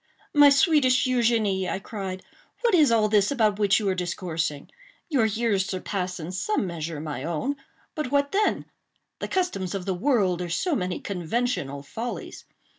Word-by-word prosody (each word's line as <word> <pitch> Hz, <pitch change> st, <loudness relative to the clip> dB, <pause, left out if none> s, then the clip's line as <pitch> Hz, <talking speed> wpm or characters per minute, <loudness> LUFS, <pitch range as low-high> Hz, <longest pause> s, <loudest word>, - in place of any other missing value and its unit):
"My 290 Hz, -1 st, +8 dB
sweetest 280 Hz, -4 st, +4 dB
Eugénie," 225 Hz, -7 st, +1 dB
I -, -, -1 dB
cried, 190 Hz, -2 st, -6 dB, 0.4 s
"what 475 Hz, -3 st, +2 dB
is 305 Hz, -8 st, +5 dB
all 220 Hz, -2 st, +4 dB
this 205 Hz, -2 st, +3 dB
about 215 Hz, -6 st, +1 dB
which 200 Hz, -1 st, +4 dB
you 210 Hz, -, -2 dB
are 190 Hz, -, +2 dB
discoursing? 170 Hz, -5 st, -3 dB, 0.4 s
Your 265 Hz, -8 st, +3 dB
years 215 Hz, -3 st, 0 dB
surpass 185 Hz, -1 st, -3 dB
in 165 Hz, +2 st, -6 dB
some 205 Hz, -, -1 dB
measure 165 Hz, -3 st, -4 dB
my 150 Hz, -3 st, -5 dB
own. 170 Hz, -, -2 dB, 0.4 s
But 305 Hz, -4 st, -3 dB
what 285 Hz, +1 st, +1 dB
then? 420 Hz, +2 st, +1 dB, 0.5 s
The -, -, -3 dB
customs 355 Hz, -, -1 dB
of 190 Hz, -2 st, -4 dB
the 190 Hz, -, 0 dB
world 185 Hz, -4 st, +1 dB
are 175 Hz, -, -4 dB
so 325 Hz, -, 0 dB
many 180 Hz, -5 st, -2 dB
conventional 180 Hz, -, -2 dB
follies. 230 Hz, +12 st, -6 dB
200 Hz, 165 wpm, -25 LUFS, 180-255 Hz, 0.5 s, My